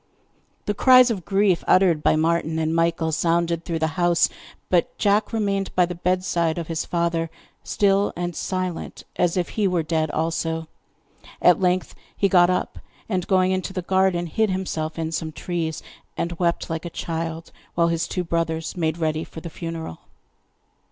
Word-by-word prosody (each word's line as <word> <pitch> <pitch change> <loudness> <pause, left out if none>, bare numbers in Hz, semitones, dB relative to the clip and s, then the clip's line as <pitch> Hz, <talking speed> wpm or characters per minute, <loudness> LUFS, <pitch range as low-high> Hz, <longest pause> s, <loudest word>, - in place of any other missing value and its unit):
The 205 - 0
cries 255 +2 +6
of 190 -7 -4
grief 195 -1 +2
uttered 180 -5 +4
by - - +3
Martin 160 0 +1
and 160 0 0
Michael 165 -1 +1
sounded 170 +1 +1
through 165 -1 -2
the 160 +2 -2
house, 175 -1 +4 0.4
but 175 -2 +1
Jack 205 +1 +2
remained 200 -3 0
by 180 - +5
the 180 - -5
bedside 175 -2 0
of 170 - -3
his 160 -1 -2
father, 170 -1 -1 0.3
still 200 0 +2
and 175 -1 -3
silent, 185 -2 -4
as 175 0 +1
if 175 - 0
he 210 -3 0
were 180 -3 +1
dead 155 -1 0
also. 160 +1 -2 0.7
At 180 +1 +5
length 180 0 +1 0.2
he 200 - +3
got 175 -2 +5
up, 180 - -1 0.3
and 185 -4 -2
going 185 -1 +3
into 185 +1 -2
the 185 -2 -3
garden, 190 -1 +2
hid 215 +6 0
himself 170 -4 -3
in 160 -1 -2
some 160 0 -3
trees, 160 0 -3 0.3
and 170 - -1
wept 170 -1 0
like 165 -1 -4
a - - -3
child, 165 0 -4 0.2
while 170 -1 +3
his 165 -1 -1
two 180 - -2
brothers 165 -1 -2
made 160 -2 -1
ready 155 -1 -1
for - - -9
the 165 0 -8
funeral. 165 - -6
170 Hz, 170 wpm, -23 LUFS, 165-185 Hz, 0.7 s, cries